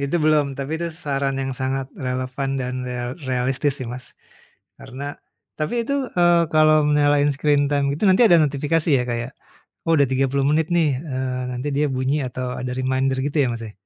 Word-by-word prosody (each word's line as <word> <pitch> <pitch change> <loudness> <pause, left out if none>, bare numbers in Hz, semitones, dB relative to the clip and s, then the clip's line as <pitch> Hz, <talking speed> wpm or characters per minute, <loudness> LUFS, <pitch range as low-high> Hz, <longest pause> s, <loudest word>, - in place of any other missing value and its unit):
Itu 140 +4 0
belum. 155 -2 +4
Tapi 140 +2 -4
itu 170 - -1 0.2
saran 135 -1 -1
yang 135 0 -3
sangat 130 0 -1 0.2
relevan 130 +2 -3
dan 125 0 -3
real 125 0 -4 0.2
realistis 130 +3 0
sih, 130 - -5
Mas, 125 0 -8 0.7
karena 130 +2 -9 0.6
tapi 155 +6 -2
itu, 280 - -1 0.2
eee, 175 -1 +5
kalau 155 0 +5 0.2
nyalain 145 0 +3
screen 145 0 +2
time 145 -1 +1
gitu 150 - -5
nanti 190 +6 +5
ada 175 -6 +6
notifikasi 150 +3 0
ya 125 - 0
kayak, 120 +3 -3 0.5
"Oh 165 - +2
udah 140 -1 +4
30 135 +1 +1
menit 155 +1 +2
nih." 165 -3 +3
Eee, 130 -4 -3
nanti 125 +3 -4
dia 150 - +2
bunyi 130 +2 0
atau 125 +1 -5
ada 125 0 -4
reminder 130 +1 0
gitu 145 +2 -2
ya, - - +1
Mas, 115 - -6
ya? - - -10
140 Hz, 185 wpm, -22 LUFS, 130-150 Hz, 0.7 s, ada